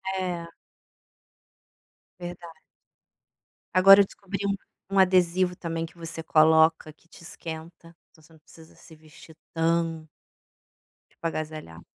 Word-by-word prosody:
É. 180 Hz, -3 st, -3 dB, 1.7 s
Verdade. 175 Hz, -1 st, -9 dB, 1.2 s
Agora 195 Hz, +2 st, +9 dB
eu 200 Hz, -, +6 dB
descobri 200 Hz, 0 st, -8 dB
um 200 Hz, -, 0 dB, 0.3 s
um 195 Hz, 0 st, 0 dB
adesivo 185 Hz, -1 st, +3 dB
também 165 Hz, -2 st, -4 dB
que 165 Hz, +1 st, -10 dB
você 165 Hz, -1 st, -6 dB
coloca 160 Hz, 0 st, +3 dB
que 165 Hz, -, -31 dB
te -, -, -16 dB
esquenta, 165 Hz, +1 st, -9 dB, 0.2 s
então 160 Hz, -, -23 dB
você 160 Hz, -, -22 dB
não 160 Hz, -, -20 dB
precisa 160 Hz, +1 st, -18 dB
se 160 Hz, -, -16 dB
vestir 155 Hz, +1 st, -17 dB, 0.2 s
tão 165 Hz, -1 st, -1 dB, 1.0 s
tipo 165 Hz, -, -5 dB
agasalha 155 Hz, -, -6 dB
165 Hz, 120 wpm, -26 LUFS, 160-180 Hz, 1.7 s, Agora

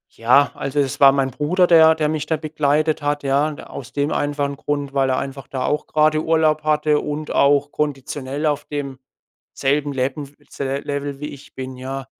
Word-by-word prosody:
ja, 125 Hz, +5 st, +4 dB
also, 135 Hz, +2 st, -3 dB
das 140 Hz, 0 st, -1 dB
war 140 Hz, -1 st, +8 dB
mein 135 Hz, -1 st, 0 dB
Bruder, 160 Hz, +8 st, +2 dB
der 160 Hz, -2 st, +7 dB
der 155 Hz, -1 st, 0 dB
mich 155 Hz, -1 st, -2 dB
da 160 Hz, -, 0 dB
begleitet 155 Hz, 0 st, 0 dB
hat, 145 Hz, 0 st, -1 dB
ja. 140 Hz, +2 st, +2 dB
D 145 Hz, -, -10 dB
aus 130 Hz, -1 st, -9 dB
dem 145 Hz, +1 st, 0 dB
einfachen 145 Hz, -1 st, -1 dB
Grund, 145 Hz, -1 st, -3 dB
weil 135 Hz, -1 st, +2 dB
er 130 Hz, -, +1 dB
einfach 135 Hz, 0 st, -5 dB
da 130 Hz, -2 st, -3 dB
auch 150 Hz, +1 st, -1 dB
grade 155 Hz, 0 st, +2 dB
Urlaub 155 Hz, -1 st, +2 dB
hatte 150 Hz, -1 st, +2 dB
und 150 Hz, +1 st, -4 dB
auch 145 Hz, +1 st, +3 dB
konditionell 140 Hz, 0 st, -3 dB
auf 145 Hz, -1 st, 0 dB
dem 140 Hz, -3 st, -5 dB, 0.5 s
selben 145 Hz, +1 st, 0 dB
Lev 130 Hz, 0 st, -1 dB, 0.4 s
se 135 Hz, -1 st, -3 dB
Level 140 Hz, -1 st, -4 dB
wie 150 Hz, -, -4 dB
ich 140 Hz, -, -13 dB
bin, 130 Hz, 0 st, -6 dB
ja? 135 Hz, +1 st, -5 dB
145 Hz, 190 wpm, -21 LUFS, 135-150 Hz, 0.5 s, war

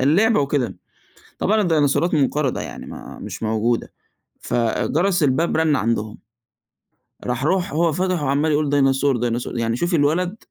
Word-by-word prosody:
اللعبة 180 Hz, -, +3 dB
وكده، 140 Hz, -3 st, -1 dB, 0.6 s
طبعًا 215 Hz, +2 st, +2 dB
الديناصورات 165 Hz, -1 st, +2 dB
منقرضة 145 Hz, -2 st, +1 dB
يعني -, -, -7 dB
ما -, -, -10 dB
مش -, -, -8 dB
موجودة، 110 Hz, +2 st, -1 dB, 0.5 s
فجرس 160 Hz, -, 0 dB
الباب 150 Hz, +4 st, +1 dB
رن 160 Hz, -2 st, +2 dB
عندهم، 110 Hz, -2 st, -2 dB, 1.1 s
راح، 125 Hz, +2 st, -2 dB
راح 180 Hz, +1 st, 0 dB
هو 165 Hz, +2 st, +2 dB
فتح 180 Hz, 0 st, -1 dB
وعمّال 145 Hz, +3 st, +1 dB
يقول: 150 Hz, -1 st, +1 dB
"ديناصور، 135 Hz, -1 st, +2 dB
ديناصور"، 120 Hz, 0 st, -2 dB
يعني 115 Hz, 0 st, 0 dB
شوفِي 170 Hz, +6 st, 0 dB
الولد؟! 170 Hz, +6 st, +1 dB
145 Hz, 135 wpm, -21 LUFS, 125-170 Hz, 1.1 s, اللعبة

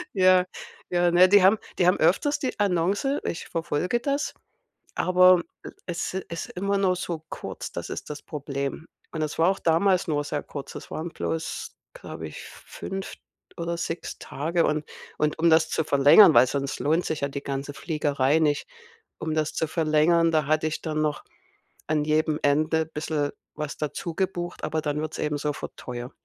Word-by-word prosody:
Ja, 185 Hz, -1 st, +5 dB, 0.4 s
ja, 175 Hz, -1 st, +2 dB
ne, 180 Hz, +2 st, +7 dB
die 205 Hz, -1 st, +6 dB
haben 195 Hz, +4 st, +6 dB, 0.2 s
die 180 Hz, -, +3 dB
haben 180 Hz, -, +4 dB
öfters 195 Hz, -, +2 dB
die 260 Hz, -4 st, -3 dB
Annonce, 200 Hz, -, +1 dB
ich 165 Hz, -, -4 dB
verfolge 170 Hz, +7 st, -1 dB
das, 280 Hz, +3 st, -1 dB, 0.6 s
aber 185 Hz, -1 st, +5 dB, 0.2 s
e -, -, -7 dB, 0.2 s
es 175 Hz, 0 st, -3 dB
ist 175 Hz, -3 st, -5 dB
immer 200 Hz, +2 st, -1 dB
nur 190 Hz, -2 st, +2 dB
so 170 Hz, -3 st, -4 dB
kurz, -, -, -6 dB
das -, -, -6 dB
ist -, -, -6 dB
das 150 Hz, 0 st, -6 dB
Problem. 140 Hz, +1 st, -5 dB, 0.2 s
Und 160 Hz, -, -4 dB
es 155 Hz, -1 st, -3 dB
war 165 Hz, +2 st, +5 dB
auch 195 Hz, -, -1 dB
damals 180 Hz, +3 st, +2 dB
nur 145 Hz, -2 st, 0 dB
sehr 145 Hz, 0 st, -3 dB
kurz. 140 Hz, -2 st, -8 dB
Es -, -, -9 dB
waren 160 Hz, +2 st, -4 dB
bloß, 165 Hz, -1 st, -4 dB, 0.2 s
glaube -, -, -8 dB
ich, -, -, -9 dB
5 195 Hz, 0 st, -7 dB, 0.4 s
oder 170 Hz, 0 st, -3 dB
6 170 Hz, 0 st, -4 dB
Tage. 165 Hz, +5 st, -1 dB
Und 150 Hz, 0 st, 0 dB, 0.3 s
und 150 Hz, +1 st, 0 dB
um 170 Hz, +1 st, +4 dB
das 160 Hz, 0 st, +4 dB
zu -, -, 0 dB
verlängern- 145 Hz, +7 st, +7 dB
weil 130 Hz, -, +7 dB
sonst 140 Hz, +1 st, -3 dB
lohnt 160 Hz, +4 st, +1 dB
sich 155 Hz, -, -2 dB
ja 140 Hz, -, +1 dB
die 140 Hz, 0 st, -6 dB
ganze 140 Hz, +1 st, -4 dB
Fliegerei 145 Hz, -2 st, +1 dB
nicht- 150 Hz, -2 st, +1 dB, 0.5 s
um 160 Hz, -, -2 dB
das 155 Hz, -1 st, 0 dB
zu 160 Hz, -, -1 dB
verlängern, 165 Hz, +1 st, +3 dB
da 155 Hz, -2 st, +2 dB
hatte 155 Hz, +2 st, +1 dB
ich 155 Hz, -, -4 dB
dann 155 Hz, -1 st, -2 dB
noch 150 Hz, -1 st, -1 dB, 0.6 s
an 150 Hz, 0 st, +1 dB
jedem 155 Hz, 0 st, +1 dB
Ende 155 Hz, +3 st, +2 dB
bisschen 150 Hz, -2 st, -2 dB, 0.2 s
was 150 Hz, -1 st, -5 dB
dazu 155 Hz, +2 st, -4 dB
gebucht, 175 Hz, -2 st, -3 dB
aber 155 Hz, -, -1 dB
dann 150 Hz, -1 st, -2 dB
wird's 155 Hz, 0 st, -5 dB
eben 150 Hz, -1 st, -1 dB
sofort 145 Hz, 0 st, -4 dB
teuer. 125 Hz, 0 st, -6 dB
160 Hz, 180 wpm, -25 LUFS, 150-180 Hz, 0.6 s, ne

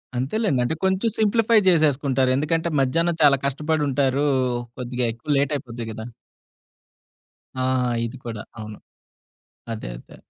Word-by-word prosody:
అంతేలెండి 135 Hz, -, 0 dB
అంటే 125 Hz, +6 st, -1 dB
కొంచెం 190 Hz, +4 st, +1 dB
సింప్లిఫై 225 Hz, +1 st, +3 dB
చేసేసుకుంటారు. 140 Hz, -5 st, +2 dB
ఎందుకంటే 160 Hz, +4 st, 0 dB
మధ్యాహ్నం 165 Hz, +5 st, +1 dB
చాలా 140 Hz, -1 st, +6 dB
కష్టపడి 150 Hz, +3 st, 0 dB
ఉంటారు. 135 Hz, +1 st, +1 dB, 0.5 s
కొద్దిగా 125 Hz, -1 st, -2 dB
ఎక్కువ 140 Hz, +6 st, -2 dB
లేట్ 140 Hz, +1 st, +1 dB
అయిపోద్ది 120 Hz, -4 st, -7 dB
కదా! 110 Hz, +1 st, -7 dB, 1.5 s
ఆ! 130 Hz, -, -3 dB, 0.4 s
ఇది 115 Hz, +3 st, -7 dB
కూడా 110 Hz, -3 st, -5 dB, 0.2 s
అవును. 110 Hz, -1 st, -8 dB, 0.9 s
అదే 110 Hz, -, -6 dB
అదే. -, -, -15 dB
140 Hz, 120 wpm, -23 LUFS, 125-160 Hz, 1.5 s, చాలా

